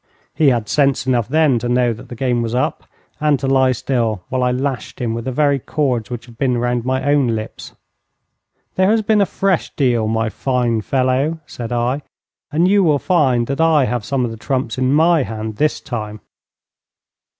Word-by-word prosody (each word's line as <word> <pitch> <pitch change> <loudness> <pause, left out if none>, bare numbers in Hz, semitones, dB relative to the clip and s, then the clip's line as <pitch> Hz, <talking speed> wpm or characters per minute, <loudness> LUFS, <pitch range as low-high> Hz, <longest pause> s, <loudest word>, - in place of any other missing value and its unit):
He 155 - +2
had 120 -5 +2
sense 140 +1 +1
enough 120 -4 +1
then 150 -3 +3
to 120 +2 -3
know 125 -1 +2
that 110 - -12
the 120 - -7
game 125 -1 0
was 115 0 -2
up, 125 - -1 0.3
and 150 -2 +2
to 135 - -3
lie 135 -1 +3
still 115 -6 -1
while 130 0 -1
I 125 - +2
lashed 130 -1 -3
him 115 -2 -1
with 115 +1 -5
the 130 - -2
very 140 +1 +2
cords 125 -6 -1
which 120 -1 -6
had 120 -2 -17
been 125 -3 +1
round 120 0 -1
my 130 0 -1
own 145 -2 +3
limbs. 110 0 -7 1.0
'There 185 +1 +2
has 220 0 +2
been 210 0 +3
a 200 - +2
fresh 190 -2 0
deal, 120 -6 +1
my 110 0 0
fine 120 -2 -1
fellow,' 130 +6 0
said 120 -4 -7
I, 120 +4 0 0.5
'and 165 +4 +2
you 200 +1 +4
will 150 -4 +3
find 135 -8 +2
that 140 +4 -2
I 160 -4 +4
have 120 -3 -2
some 130 +2 -1
of 115 - -4
the 115 - -8
trumps 130 +1 -2
in 130 0 +1
my 160 +2 +4
hand 110 -3 -5
this 150 -1 +1
time.' 105 -3 -6
130 Hz, 200 wpm, -18 LUFS, 120-145 Hz, 1.0 s, you